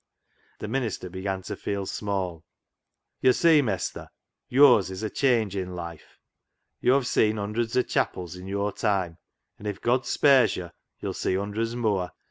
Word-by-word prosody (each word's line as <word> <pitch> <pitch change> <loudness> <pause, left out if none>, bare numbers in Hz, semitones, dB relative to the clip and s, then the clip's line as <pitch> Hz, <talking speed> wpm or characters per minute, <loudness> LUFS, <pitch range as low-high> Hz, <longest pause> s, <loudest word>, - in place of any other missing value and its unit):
The - - -6
minister 110 -7 -3
began 95 +1 -3
to - - -5
feel 100 -1 -3
small. 95 -5 -3 0.4
" - - -56
Yd' 130 -1 +5
see, 165 -3 +5
Mestur, 105 -9 -3 0.4
yo'rs 125 -7 +6
is 95 +3 -6
a 110 - -2
changin' 100 -8 0
life. 85 -2 -9 0.6
YoVe 130 +1 +3
seen 110 -2 +2
hundreds 110 +3 -2
o' 125 - +4
chapels 90 -6 -2
i' 90 - -9
yo'r 100 +2 -2
time, 95 -5 -1 0.4
an' 105 - -7
if 100 -2 -3
God 125 +1 +1
spares 130 -7 +4
yo' 85 -2 -6 0.3
yo'll - - -3
see - - -1
hundreds 105 +4 -2
mooar. 100 -7 -1
100 Hz, 155 wpm, -26 LUFS, 95-120 Hz, 0.6 s, yo'rs